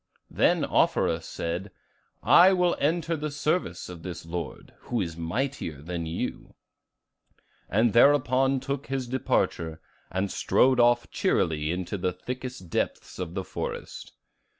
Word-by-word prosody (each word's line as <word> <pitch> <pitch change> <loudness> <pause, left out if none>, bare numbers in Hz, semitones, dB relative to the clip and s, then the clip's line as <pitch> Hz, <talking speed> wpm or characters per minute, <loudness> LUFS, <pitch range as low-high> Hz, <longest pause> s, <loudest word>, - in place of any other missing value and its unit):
Then - - +3
Offerus - - +2
said, 85 +4 -4 0.5
'I 175 - +7
will 180 -1 +2
enter 165 +2 +1
the 150 0 -3
service 145 - -1
of 90 -2 -9
this 85 -1 -7
lord, 85 -1 -6
who 120 - -1
is 85 -5 -2
mightier 85 - -3
than 85 +2 -4
you,' 80 - -5 1.1
and 110 +2 +3
thereupon 135 +1 +4
took 140 +1 -4
his 135 -1 -2
departure, 85 -10 -1 0.3
and 95 +2 -2
strode 130 -1 +3
off 120 0 +3
cheerily 75 -1 +1
into 90 +3 -3
the 90 +1 0
thickest 125 +1 -6
depths - - -2
of 90 -1 -5
the 95 - -2
forest. - - -6
115 Hz, 130 wpm, -27 LUFS, 85-135 Hz, 1.1 s, I